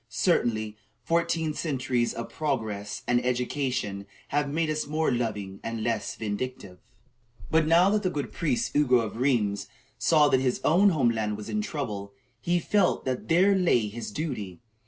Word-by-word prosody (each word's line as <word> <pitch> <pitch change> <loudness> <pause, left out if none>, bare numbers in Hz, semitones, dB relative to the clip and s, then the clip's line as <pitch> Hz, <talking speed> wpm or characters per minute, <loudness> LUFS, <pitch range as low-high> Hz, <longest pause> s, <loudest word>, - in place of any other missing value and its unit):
Certainly, 110 - 0 0.3
fourteen 165 +1 0
centuries 130 -6 -1
of 115 - -6
progress 110 -9 -3
and 125 0 +2
education 125 -5 -2 0.2
have 145 0 0
made 160 +3 0
us 155 -1 -2
more 155 0 0
loving 105 -5 -3
and 115 -1 -4
less 115 -2 -1
vindictive. 105 -3 -5 0.7
But 160 -1 +3
now 175 +4 +5
that 210 0 +2
the 185 - 0
good 145 -5 -4
priest 230 +8 -1
Ugo 145 -4 +4
of 115 -2 -2
Rheims 115 -6 +1 0.3
saw 155 -3 +5
that 130 - +3
his 130 -1 0
own 185 +6 +5
home 135 -10 +2
land 105 -2 -2
was 105 - -8
in 215 - 0
trouble, 105 - -4 0.3
he 175 +1 +1
felt 190 +2 +1
that 130 -1 -3
there 185 +4 +4
lay 125 - +2
his 115 +3 -6
duty. 105 - -4
130 Hz, 160 wpm, -27 LUFS, 110-160 Hz, 0.7 s, now